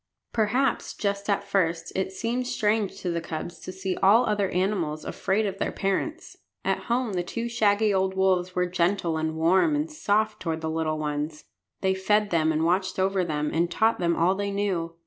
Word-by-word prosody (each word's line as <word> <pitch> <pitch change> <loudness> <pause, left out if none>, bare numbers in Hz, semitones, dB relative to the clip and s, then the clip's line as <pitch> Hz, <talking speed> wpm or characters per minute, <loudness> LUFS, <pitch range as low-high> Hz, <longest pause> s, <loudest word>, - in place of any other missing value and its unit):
Perhaps, 240 +4 +1
just 200 0 -2
at 200 0 +1
first, 170 -4 -1
it 190 0 -1
seemed 235 +5 -2
strange 215 -4 0
to 180 - -1
the 170 0 -2
cubs 165 +1 -6
to - - -7
see 190 0 -3
all 215 +6 +5
other 205 -3 +1
animals 180 -5 -1
afraid 205 +3 0
of 195 -1 -3
their - - -1
parents. 305 - -2 0.3
At - - 0
home 235 -2 0
the 180 - 0
two 230 +6 -4
shaggy 215 -2 +2
old 190 0 +1
wolves 185 -1 +1
were 180 - +2
gentle 175 -1 0
and 160 0 -1
warm 185 - +3
and 300 +2 -1
soft 215 -6 0
toward 160 -2 -3
the 160 0 -2
little 160 -1 -1
ones. 150 0 -3 0.4
They 190 -1 +2
fed 205 +2 +1
them 160 -2 +3
and 160 +1 +1
watched 185 +3 +1
over 190 0 +1
them 150 -3 -1
and 170 +1 +1
taught 220 +6 +2
them 170 -1 +1
all 175 +3 +3
they 200 +1 -2
knew. 190 -5 -2
190 Hz, 195 wpm, -26 LUFS, 170-210 Hz, 0.4 s, all